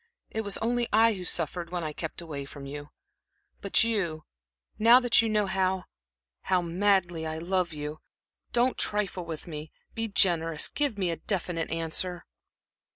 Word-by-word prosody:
It 220 - -1
was 205 -2 -3
only 240 +1 0
I 225 +1 +5
who 185 -3 -6
suffered 170 0 -1
when 175 -1 -3
I 155 -1 -3
kept 160 +2 -4
away 150 -4 -5
from 140 0 -10
you. 145 +1 -7 0.7
But 200 - +4
you 185 -9 -1 0.6
now 230 +3 +8
that 245 -3 +4
you 225 - 0
know 210 -1 +2
how 190 -1 0 0.6
how 185 -2 +1
madly 175 -2 +1
I 155 0 -3
love 180 +1 0
you 150 0 -5 0.5
don't 245 +2 +2
trifle 195 -4 -1
with 160 -2 -6
me 155 -2 -7 0.2
be 225 0 -1
generous 165 -6 +3
give 285 -7 0
me 185 -3 0
a 165 - -3
definite 175 -4 -2
answer?" 165 +2 -2
180 Hz, 160 wpm, -28 LUFS, 160-210 Hz, 0.7 s, now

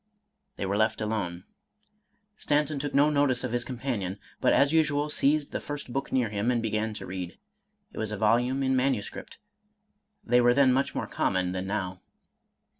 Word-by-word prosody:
They - - -3
were 100 +1 0
left 110 +1 +1
alone. 100 -5 -3 0.9
Stanton 150 -4 0
took 145 0 -3
no 145 +2 +5
notice 140 -4 +2
of 125 - -2
his 120 0 0
companion, 120 -8 -3 0.2
but - - +3
as 140 +2 +4
usual 150 -2 +2
seized 150 0 +2
the - - -2
first 145 -4 -6
book 135 0 -3
near 125 -4 +1
him, 105 +3 -1
and 125 -1 +2
began 110 -1 -1
to - - -7
read. 90 -1 -6 0.6
It - - -7
was 110 -1 -2
a 105 - -3
volume 120 +6 +2
in 130 0 +2
manu 130 -5 +1
script, - - -9 0.5
— 210 0 -49
they 120 +1 +4
were 120 0 +4
then 135 -2 +5
much 135 +2 0
more - - -1
common 95 -2 0
than 95 +1 -3
now. 95 -2 -3
120 Hz, 190 wpm, -28 LUFS, 105-140 Hz, 0.9 s, no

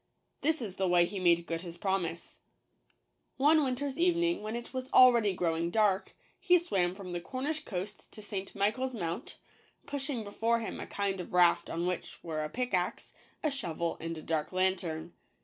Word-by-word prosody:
This 315 -3 +1
is 195 -4 -6
the 190 - +1
way 175 -1 +5
he 195 +2 -5
made 170 -2 +4
good 165 -1 -3
his 170 -1 -8
promise: 185 -4 -2 0.5
— - - -44
One 310 0 +6
winter 260 +1 -1
s 275 0 -4
evening, 345 -2 +2
when 215 +2 -4
it 235 +2 -6
was 260 0 -4
already 235 -5 +7
growing 170 -2 0
dark, 205 -1 +1 0.2
he 360 -2 +5
swam 190 - 0
from 190 -2 -8
the 175 - -2
Cornish 275 - -3
coast 195 +2 -6
to 215 - -9
St. 195 -2 -5
Michael's 245 +6 0
Mount, 175 +3 -4 0.5
pushing 275 -4 -3
before 225 +3 +1
him 230 - -5
a - - -6
kind 195 -2 -2
of 180 - -10
raft 175 -1 +4
on 170 +1 -2
which 180 0 -3
were 155 -2 -2
a 155 - -3
pickaxe, 200 -5 -2 0.3
a 305 - +2
shovel, 170 - -3
and 165 0 -4
a 155 - -8
dark 155 -2 -1
lantern. 180 -3 0
195 Hz, 185 wpm, -31 LUFS, 175-255 Hz, 0.5 s, already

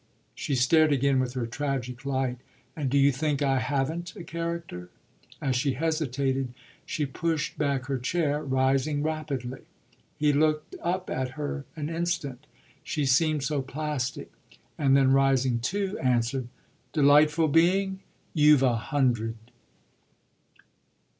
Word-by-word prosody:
She 140 - -2
stared 155 +5 +4
again 140 -1 +2
with 125 -1 -1
her 125 -3 -2
tragic 125 0 -4
light. 130 -2 -1 0.4
"And 145 -4 -2
do 140 - +2
you 140 0 +5
think 145 +1 -1
I 135 -1 +2
haven't 145 +7 -2
a - - -8
character?" 165 - -5 0.5
As 130 -3 0
he 140 -1 0
hesitated 135 -4 -1 0.3
she 150 - -1
pushed 160 +3 -2
back 140 -3 -1
her 135 -1 -2
chair, 150 +2 0
rising 135 +2 +1
rapidly. 145 -5 -3 0.6
He 150 -1 +3
looked 155 +1 +1
up 180 +2 -2
at 130 -1 -2
her 145 -1 -4
an 150 -2 -4
instant 165 -5 -3 0.4
she 150 -2 -2
seemed 150 +2 +2
so 145 -1 0
"plastic"; 140 -1 -4 0.4
and 135 -2 +3
then 135 -1 +4
rising 135 -3 +3
too 195 - -2
answered: 125 0 +1 0.5
"Delightful 150 +1 +5
being, 190 +5 +3 0.3
you've 150 -3 +5
a 125 -3 +3
hundred!" 115 -2 0
140 Hz, 130 wpm, -27 LUFS, 130-155 Hz, 0.6 s, you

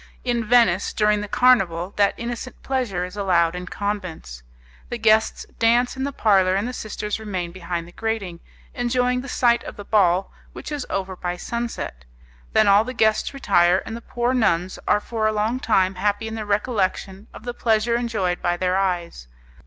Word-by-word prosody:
In 240 -2 0
Venice, 215 -5 +3
during 210 -1 +2
the 210 - -5
carnival, 195 -7 +3
that 200 -1 +3
innocent 240 +1 -6
pleasure 235 -10 -1
is 180 - -10
allowed 175 -5 +2
in 180 0 -6
convents. 185 - -5 0.5
The 240 - -3
guests 220 -1 +2
dance 240 +2 +3
in 265 +1 -2
the 280 - -2
parlour, 190 -7 +3
and 200 +4 0
the 250 - -5
sisters 210 -2 -4
remain 185 -5 -4
behind 170 -1 -5
the - - -13
grating, 205 -5 -3 0.3
enjoying 250 +1 0
the 270 - -9
sight 240 -1 +2
of - - -8
the 205 - -9
ball, 190 -3 +2 0.2
which - - -8
is 290 -3 -4
over 190 -1 -3
by 180 0 -4
sunset. 235 - -5 0.5
Then 215 - +4
all 200 +2 +6
the 255 +2 -6
guests 220 -1 +2
retire, 185 -9 +3
and 225 - -6
the 235 - -7
poor 240 +2 -1
nuns 185 -7 +1
are 210 - +3
for 220 -1 -1
a - - +2
long 215 +4 -1
time 190 -6 +2
happy 205 +3 -1
in 220 - -5
the 215 -2 -5
recollection 200 -2 -1
of - - -12
the 245 0 -4
pleasure 230 0 +1
enjoyed 215 -7 -1
by 175 0 0
their 185 +1 +1
eyes. 175 - -2
210 Hz, 185 wpm, -22 LUFS, 185-235 Hz, 0.5 s, all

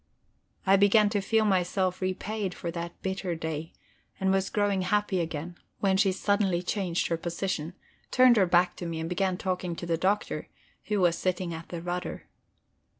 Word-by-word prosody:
I 195 0 +6
began 205 +1 +5
to 205 -2 +1
feel 220 +2 +2
myself 185 -1 +1
repaid 190 +1 -2
for 170 - -4
that 170 0 -6
bitter 190 -2 -2
day, 160 -1 -4 0.5
and 190 0 +2
was 195 0 +1
growing 205 -2 +1
happy 205 0 +1
again, 165 +2 -5 0.2
when 195 -1 +2
she 195 0 +3
suddenly 195 -2 +1
changed 180 -2 -1
her 165 - +1
position, 170 0 -3 0.3
turned 255 -1 +6
her 190 -3 +4
back 175 +1 +3
to 175 - -5
me, 165 -1 -3
and 160 - -3
began 185 +1 0
talking 180 -2 -2
to 175 - -6
the 165 -1 0
Doctor, 195 +3 0 0.4
who 210 -2 0
was 170 -2 +3
sitting 180 -2 -1
at 165 0 -8
the 170 -1 -6
rudder. 180 +1 -4
185 Hz, 175 wpm, -28 LUFS, 170-195 Hz, 0.5 s, I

